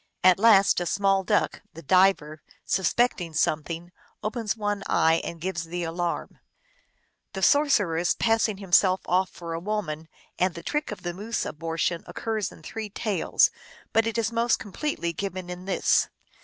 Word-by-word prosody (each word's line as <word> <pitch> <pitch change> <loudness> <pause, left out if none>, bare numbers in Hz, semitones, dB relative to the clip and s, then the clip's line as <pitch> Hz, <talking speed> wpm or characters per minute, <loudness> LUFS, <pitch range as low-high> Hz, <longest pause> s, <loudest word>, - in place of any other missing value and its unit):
At 185 0 +6
last 200 -4 +5
a 175 - -2
small 195 +1 +2
duck, - - 0
the 165 - -10
diver, 180 -3 +3 0.2
suspecting 190 -3 +1
something, 165 +3 -1 0.3
opens 220 -1 -2
one 205 -1 -2
eye, 160 +1 +3
and 170 - -6
gives 170 -1 -3
the 175 +1 -4
alarm. 170 +1 -3 0.9
The 190 - -4
sorcerer 235 - +3
s 175 - +1
passing 225 -2 +2
himself 190 -1 +3
off 185 +1 +1
for 170 -1 -7
a 165 - -3
woman 170 -5 -3 0.3
and 180 0 +1
the 170 - -8
trick 300 -4 -2
of 210 - -8
the 175 -1 -3
moose 215 +6 -3
abortion 165 +2 -2
occurs 220 -3 -3
in 160 - -15
three 220 +5 -6
tales, 205 0 +2 0.4
but 225 0 +3
it 225 - -2
is 230 -1 0
most 235 0 +2
completely 200 - -3
given 185 0 -5
in 180 +1 -8
this. 195 - +2
190 Hz, 160 wpm, -26 LUFS, 170-215 Hz, 0.9 s, At